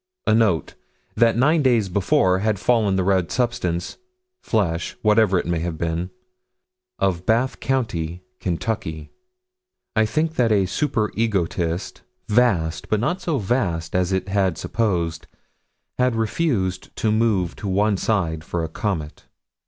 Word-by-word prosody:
A 110 - +3
note: 110 -7 +2 0.4
That 115 0 +3
nine 150 +6 +4
days 120 -7 +3
before 95 0 +2
had 105 0 0
fallen 105 -2 +2
the 95 - +1
red 95 -2 +1
substance 90 -9 -1 0.4
flesh 85 -7 -1
whatever 105 -3 +4
it - - -1
may 85 -1 0
have 85 -1 -3
been 85 +2 -2 0.9
of 90 -2 -1
Bath 120 +4 +1
County, 90 -10 -2 0.2
Kentucky. 85 -4 -3 0.8
I 110 0 +3
think 160 +6 -1
that 115 -3 +3
a 100 -3 +3
super 110 +1 -1
egotist, 90 -5 -1 0.3
vast, 105 -8 +1
but 110 - +2
not 175 - -1
so 165 -5 -1
vast 95 -8 -1
as 90 0 +1
it 95 0 -1
had 95 -3 +1
supposed, 85 -7 -1 0.7
had 125 -1 +2
refused 110 - -1
to 110 - 0
move 105 -6 +1
to 105 - -5
one 100 +2 +2
side 85 -6 -1
for 85 0 -3
a 80 - -3
comet. 80 -4 -4
100 Hz, 140 wpm, -22 LUFS, 85-115 Hz, 0.9 s, nine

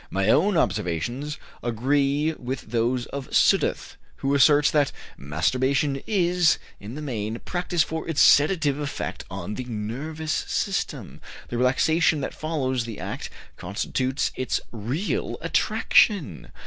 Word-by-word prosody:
My 95 +2 0
own 185 - +4
observations 105 - -1 0.2
agree 140 +6 +1
with 130 -2 -5
those 120 +1 0
of 140 -2 -4
Sudduth, - - +2 0.2
who 135 +1 -1
asserts 145 +1 +5
that 145 -2 +2 0.2
"masturbation 130 - 0
is, 180 -5 +3 0.2
in 105 +5 -8
the 155 - -6
main, 110 -5 -3
practiced 175 -2 0
for 160 +1 -5
its 160 - -1
sedative 150 -2 +5
effect 145 -1 -4
on 105 - -5
the 125 - -5
nervous 135 +8 -4
system. - - -2 0.3
The 120 - -3
relaxation 155 +5 +3
that - - -4
follows 130 -6 -2
the 115 -3 -7
act - - -5 0.3
constitutes 130 +8 -2
its 130 - -1
real 120 - -2
attraction.... 155 - +2
135 Hz, 125 wpm, -25 LUFS, 120-155 Hz, 0.3 s, asserts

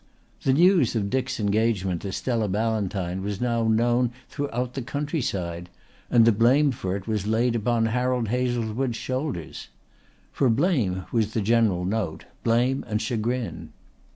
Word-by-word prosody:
The 130 - +2
news 170 - +4
of 100 -3 -1
Dick's 130 -2 -1
engagement 100 -4 0
to 100 - -4
Stella 115 0 -1
Ballantyne 100 -3 -1
was 100 0 -3
now 115 -2 0
known 120 +2 +2 0.2
throughout 125 -4 -3
the 135 - -3
countryside 110 - -3 0.4
and 115 -2 +5
the 115 - +6
blame 130 +7 +4
for 110 -7 -3
it 100 0 -6
was 105 -2 -1
laid 115 +2 +2
upon 115 0 +1
Harold 125 0 0
Hazlewood's 120 0 -1
shoulders. 130 - -4 0.6
For 135 - +2
blame 115 - +1
was 110 -2 0
the 110 - +1
general 105 -4 +2
note, 95 -5 -2 0.2
blame 120 +4 +2
and 105 -1 -1
chagrin. 115 +2 -3
115 Hz, 145 wpm, -25 LUFS, 105-125 Hz, 0.6 s, the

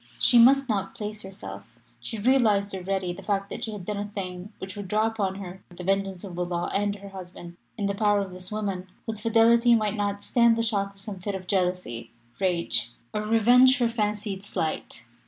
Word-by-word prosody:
She 240 - +5
must 270 +3 +6
not 195 -4 -1
place 210 0 -5
herself 105 - -9 0.2
she 120 - -5
realised 210 -4 +3
already 190 -1 -2
the 190 - -10
fact 195 0 -1
that - - -5
she 220 - -3
had 205 -4 -7
done 210 +1 -3
a 205 - -3
thing 185 -1 -6
which 190 0 -7
would 205 -2 -6
draw 215 +3 +2
upon 210 -4 -1
her 190 -1 -8
the 180 0 -9
vengeance 195 0 0
of 190 -3 -7
the 180 +1 -1
law 175 0 -2
and 205 0 0
her 200 -1 -10
husband 180 -2 -10 0.2
in 205 - -1
the 200 - 0
power 205 0 +2
of 195 -1 -5
this 185 +1 -7
woman, 200 -3 -3 0.2
whose 220 -2 -3
fidelity 230 +2 +5
might 215 -2 0
not 205 -1 -2
stand 235 -2 +4
the 230 - 0
shock 200 -3 -1
of 195 - -17
some 200 -2 -4
fit 200 +2 -3
of 185 -1 -6
jealousy, 180 - -1 0.3
rage, 175 -9 +1 0.2
or 210 - -1
revenge 240 +4 +5
for 240 -2 +2
fancied 210 -3 -2
slight. 160 -10 -3
200 Hz, 210 wpm, -26 LUFS, 185-215 Hz, 0.3 s, must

